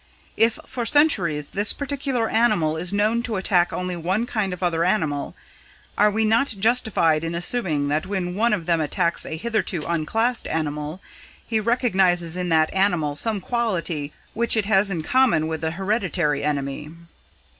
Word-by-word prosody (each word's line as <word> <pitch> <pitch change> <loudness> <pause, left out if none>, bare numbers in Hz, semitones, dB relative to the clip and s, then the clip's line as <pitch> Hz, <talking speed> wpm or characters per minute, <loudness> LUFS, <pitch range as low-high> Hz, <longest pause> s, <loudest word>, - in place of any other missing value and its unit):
If 225 0 +3
for 245 - -4
centuries, 190 - +2
this 205 +2 +3
particular 275 -4 -2
animal 215 -10 +2
is 175 +2 -1
known 215 +3 +1
to 235 -2 -4
attack 180 -2 +2
only 180 0 -3
one 185 +7 -1
kind 215 -5 -2
of 180 0 -6
other 170 -2 +1
animal, 160 -7 -1 0.6
are 210 +1 +4
we 220 +2 0
not 225 +2 +2
justified 200 -8 +2
in 165 +1 -3
assuming 170 -6 -1
that 150 +2 -1
when 185 -3 -2
one 225 +4 +1
of 195 -6 -1
them 170 -1 +1
attacks 170 +2 0
a 160 - -4
hitherto 215 -4 -2
unclassed 220 +9 -1
animal, 150 +2 -3 0.4
he 225 -2 0
recognises 190 -8 +1
in 180 -1 -2
that 160 -1 +2
animal 175 -7 +1
some 215 +7 -1
quality 180 - -2 0.2
which 235 0 +1
it 215 - +1
has 200 -1 +3
in 170 -5 -3
common 250 -6 +3
with 160 -1 -4
the 160 - -1
hereditary 180 -5 -1
enemy?" 145 0 -3
185 Hz, 165 wpm, -23 LUFS, 160-225 Hz, 0.6 s, are